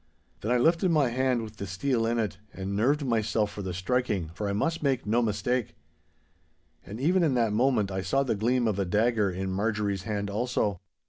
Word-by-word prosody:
Then 110 - -2
I 125 - +4
lifted 165 +8 +3
my 150 -6 +3
hand 125 -1 +1
with 110 -1 -9
the 100 - -5
steel 115 +6 0
in 120 +1 0
it, 105 -5 -2
and 95 +1 -4
nerved 140 +8 +2
myself 110 -3 0
for 100 - -6
the 95 -2 -4
striking, 95 -2 -1
for 100 +3 -3
I - - 0
must 165 +12 -1
make 135 -4 0
no 115 +3 +2
mistake. 115 +2 -1 1.1
And 105 +3 -8
even 175 +7 +3
in 150 -6 +2
that 115 -3 +2
moment 115 -4 +2
I 95 0 -2
saw 135 +10 +1
the 130 - 0
gleam 120 +3 +1
of 105 -2 0
a 100 - +1
dagger 105 +2 +2
in 95 +1 -3
Marjorie's 100 -1 -1
hand 100 0 -3
also. 105 -4 -1
110 Hz, 205 wpm, -28 LUFS, 100-125 Hz, 1.1 s, I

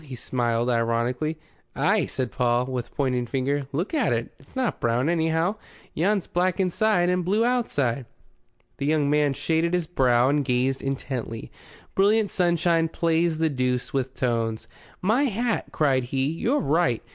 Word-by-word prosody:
He 135 -4 -8
smiled 120 -1 -1
ironically. 120 +6 0 0.4
"Ay," - - +2
said 130 -3 -3
Paul, 120 0 +1
with 125 -2 -4
pointing 125 -3 0
finger. 135 +2 -1
"Look 165 - -2
at 290 -7 +2
it. 120 0 -2
It's 135 - -21
not 260 -3 -1
brown, 120 +5 +1
anyhow. 165 +4 +1 0.4
Yon's 195 +4 +1
black 180 +1 0
inside 185 0 +2
and 180 0 +1
blue 205 +6 +2
outside." 140 - 0 0.7
The 140 - -2
young 150 -2 +2
man 150 -2 +3
shaded 165 +4 0
his 175 -2 0
brow 130 -6 +3
and 145 0 +2
gazed 130 +1 0
intently. 130 -4 -4 0.4
Brilliant 205 +2 +3
sunshine 170 -2 +2
plays 165 0 +1
the 160 0 +1
deuce 125 -2 -1
with 130 -1 -2
tones. 115 -3 -1 0.4
"My 230 +9 +3
hat!" 235 -1 -1
cried 135 -5 +1
he, 130 +2 -1
"you're 235 - 0
right. 150 -4 +1
145 Hz, 155 wpm, -25 LUFS, 125-175 Hz, 0.7 s, man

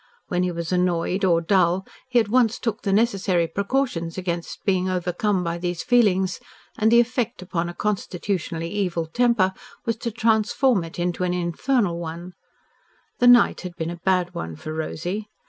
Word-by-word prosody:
When 180 -1 0
he 180 0 0
was 170 -1 -4
annoyed 180 +1 0
or 170 -3 +3
dull 180 +1 +2 0.2
he 245 -1 +4
at 220 - +1
once 235 0 +3
took 230 -2 -3
the 200 - -1
necessary 195 -5 +2
precautions 200 -3 -2
against 175 -2 -4
being 185 -2 +1
overcome 180 +2 0
by 170 0 -3
these 175 -1 -3
feelings, 195 -7 +2 0.4
and 220 -3 +2
the 235 - +7
effect 240 -3 0
upon 175 -1 -2
a 175 - -8
constitutionally 180 -4 -2
evil 180 -5 -1
temper 205 +1 +2 0.3
was 230 -2 -1
to 235 - -3
transform 220 0 +2
it 165 - -9
into 175 +1 -1
an 180 0 0
infernal 180 - 0
one. 170 +2 -7 0.9
The 245 - +4
night 245 -1 +6
had 180 -2 -7
been 165 0 -3
a 175 - -7
bad 180 -2 +1
one 80 - -5
for 155 - -7
Rosy. 175 +6 -4
185 Hz, 170 wpm, -23 LUFS, 170-220 Hz, 0.9 s, the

